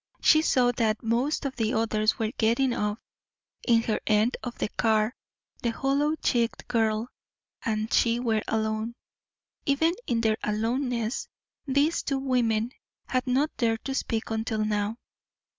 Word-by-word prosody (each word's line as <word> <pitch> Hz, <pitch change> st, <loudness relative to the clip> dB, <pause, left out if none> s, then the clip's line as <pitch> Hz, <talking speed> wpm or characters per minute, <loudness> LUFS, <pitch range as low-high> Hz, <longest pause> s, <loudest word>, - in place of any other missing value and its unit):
She 310 Hz, -, +5 dB
saw 250 Hz, -5 st, +3 dB
that 220 Hz, -1 st, +1 dB
most 245 Hz, +7 st, 0 dB
of 270 Hz, -, -3 dB
the 225 Hz, +1 st, 0 dB
others 215 Hz, -1 st, +1 dB
were 220 Hz, -1 st, -1 dB
getting 240 Hz, +2 st, +2 dB
off. 210 Hz, -1 st, -1 dB, 0.7 s
In 230 Hz, -2 st, +4 dB
her 220 Hz, -, 0 dB
end 215 Hz, +3 st, +3 dB
of 245 Hz, -1 st, -6 dB
the -, -, -1 dB
car 220 Hz, +1 st, +1 dB, 0.5 s
the 235 Hz, -, 0 dB
hollow 280 Hz, +6 st, +1 dB
cheeked 235 Hz, -6 st, 0 dB
girl 225 Hz, -1 st, +1 dB, 0.5 s
and 215 Hz, 0 st, -1 dB
she 235 Hz, 0 st, +3 dB
were 225 Hz, -3 st, +1 dB
alone. 220 Hz, +1 st, -1 dB, 0.7 s
Even 320 Hz, +4 st, +3 dB
in 230 Hz, -1 st, +1 dB
their 220 Hz, -1 st, +2 dB
aloneness 235 Hz, +2 st, -1 dB, 0.4 s
these 280 Hz, +4 st, +2 dB
two 275 Hz, -, -1 dB
women 245 Hz, -4 st, +1 dB, 0.3 s
had 255 Hz, 0 st, -1 dB
not 275 Hz, +5 st, +1 dB
dared 225 Hz, -3 st, 0 dB
to 270 Hz, -, -2 dB
speak 225 Hz, -4 st, -2 dB
until 220 Hz, -1 st, -1 dB
now. 210 Hz, +1 st, -1 dB
230 Hz, 145 wpm, -27 LUFS, 220-255 Hz, 0.7 s, She